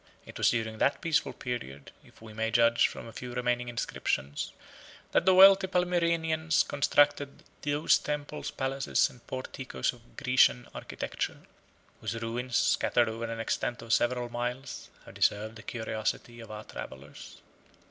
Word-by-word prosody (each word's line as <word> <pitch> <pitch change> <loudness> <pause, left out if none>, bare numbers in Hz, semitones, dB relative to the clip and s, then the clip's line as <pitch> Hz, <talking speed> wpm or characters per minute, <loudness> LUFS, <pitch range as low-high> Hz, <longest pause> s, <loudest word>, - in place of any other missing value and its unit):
It - - -10
was - - +5
during 110 -1 -2
that 140 - +2
peaceful 160 -1 +1
period, 70 - -6
if - - -19
we 110 -1 -10
may 110 +1 -1
judge 115 +1 +4
from - - -8
a 115 - -9
few 125 +2 -7
remaining 125 0 0
inscriptions, 70 - -2 0.6
that 175 - +2
the 185 - +7
wealthy 195 0 +8
Palmyrenians 170 -3 +1
constructed 145 0 +2 0.2
those 145 +1 +3
temples, 150 0 -4
palaces, 135 0 0
and 125 - -17
porticos 130 0 -3
of 120 -1 -20
Grecian 125 -2 +3
architecture, - - -4 0.6
whose 115 - -3
ruins, 120 +2 -3
scattered 120 0 +3
over 115 +1 -4
an 115 0 -5
extent 115 +1 -2
of 115 -1 -1
several 120 0 +2
miles, 120 +3 -5 0.2
have - - -12
deserved 110 +2 +1
the 110 - -10
curiosity 110 +1 -3
of 115 - -10
our 105 0 -7
travellers. 65 - -10
120 Hz, 145 wpm, -29 LUFS, 115-145 Hz, 0.6 s, wealthy